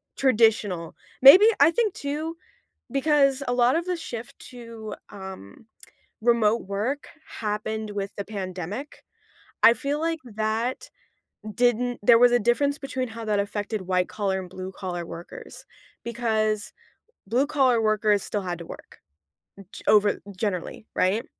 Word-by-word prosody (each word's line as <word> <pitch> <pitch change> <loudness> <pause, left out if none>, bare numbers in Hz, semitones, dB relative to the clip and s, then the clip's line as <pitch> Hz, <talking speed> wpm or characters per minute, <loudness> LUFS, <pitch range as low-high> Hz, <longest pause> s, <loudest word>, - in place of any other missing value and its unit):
traditional. 215 -9 +2 0.3
Maybe 360 +11 +10
I 290 +3 +6
think 435 -1 0
too 305 +4 -4 0.5
because 275 -1 +2
a 245 - +1
lot 245 +1 +3
of 335 +1 -1
the 365 0 -1
shift 235 -7 -8
to, 230 -3 -9 0.2
um, 190 - -10 0.5
remote 230 -1 +2
work 220 +9 -3 0.2
happened 215 0 -4
with 200 -1 -5
the 200 - -5
pandemic. 195 - -6 0.6
I 230 - +9
feel 290 +3 -3
like 330 0 -1
that 220 +2 -3 0.6
didn't 245 +1 +1
there 230 +2 +6
was 245 0 +6
a 245 - +5
difference 280 +6 +1
between 260 -2 -3
how 230 0 -8
that 210 -2 0
affected 205 +1 -3
white 180 -1 0
collar 195 -2 -2
and 180 -1 -9
blue 185 +1 -7
collar 175 -3 -5
workers 170 +1 -10 0.4
because 220 -3 -1 0.5
blue 245 +7 +1
collar 265 -5 +2
workers 215 -1 +2
still 205 - -3
had 175 -2 -4
to 170 - -8
work - - -12 0.7
g - - -10
over 210 -1 +4 0.2
generally 200 0 -3
right? 195 +5 +1
220 Hz, 140 wpm, -25 LUFS, 205-255 Hz, 0.7 s, Maybe